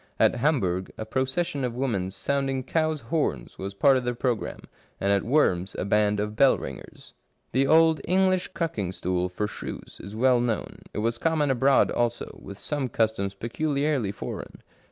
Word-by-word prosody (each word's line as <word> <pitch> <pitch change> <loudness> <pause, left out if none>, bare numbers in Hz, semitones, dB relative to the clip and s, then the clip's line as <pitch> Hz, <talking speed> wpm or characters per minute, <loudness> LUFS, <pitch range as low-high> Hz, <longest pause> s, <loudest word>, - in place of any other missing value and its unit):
At - - +4
Hamburg 105 - 0
a 110 - -4
procession 130 +5 -1
of 120 -2 -2
women 115 -8 -1
sound 135 +8 -1
ing 135 -1 -2
cows' 155 +1 0
horns 115 - -2
was 95 +1 -5
part 135 +5 +5
of 130 - -2
the 125 0 -1
programme, 120 -2 -2 0.4
and 100 - +1
at 100 -1 +3
Worms 95 -8 +1
a - - -2
band 105 0 +2
of 105 +1 -2
bell 135 +4 +5
ringers. - - -9 0.4
The 135 +3 +2
old 160 -1 +5
English 185 0 +2
cucking 105 - -2
stool 90 0 -1
for 95 +4 -2
shrews - - -7
is 100 +3 -9
well 125 +2 +4
known; 120 -3 -2
it - - -8
was 115 +1 0
common 155 -4 +2
abroad 135 +1 +4
also, 120 0 -2
with 100 0 -9
some 140 +2 -2
customs 105 -4 0
peculiarly 140 0 -1
foreign. 105 - -7
120 Hz, 175 wpm, -26 LUFS, 100-140 Hz, 0.4 s, part